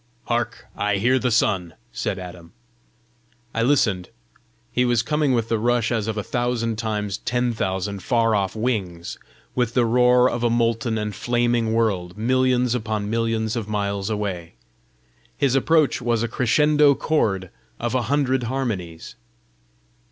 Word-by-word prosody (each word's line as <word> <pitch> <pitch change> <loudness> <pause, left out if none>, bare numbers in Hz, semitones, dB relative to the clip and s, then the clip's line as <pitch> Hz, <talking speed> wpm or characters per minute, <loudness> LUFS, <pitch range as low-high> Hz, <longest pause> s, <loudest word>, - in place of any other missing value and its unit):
"Hark! 120 -2 -2
I 105 -1 0
hear 125 +6 +2
the 125 - 0
sun," 95 -7 +1 0.2
said 95 - -3
Adam. 90 -2 -10 1.0
I 115 - 0
listened: 110 -8 +2 0.6
he 125 +1 +2
was 120 -2 +2
coming 150 +1 +1
with 115 -3 +1
the 115 -1 0
rush 120 0 +1
as 110 -3 -1
of 110 -1 -2
a 105 - -2
thousand 120 -2 -1
times 105 -3 -2
ten 120 0 0
thousand 95 -1 -2
far 115 0 +2
off 100 -1 0
wings, 100 -8 -3 0.3
with 120 -1 -1
the 125 -2 +4
roar 125 +1 +4
of 120 -1 -2
a 120 - +3
molten 115 -1 +1
and 105 -1 -3
flaming 120 0 0
world 95 -6 0
millions 125 +1 +2
upon 110 -3 -2
millions 115 -1 0
of 110 -3 -4
miles 100 -1 -2
away. 100 -6 -4 0.8
His 140 -3 +2
approach 150 +1 +2
was 120 -1 0
a - - 0
crescendo 145 +5 +3
chord 95 - 0 0.3
of 120 +1 -2
a 130 - +2
hundred 135 -3 +1
harmonies. 110 -10 -4
115 Hz, 150 wpm, -23 LUFS, 105-125 Hz, 1.0 s, the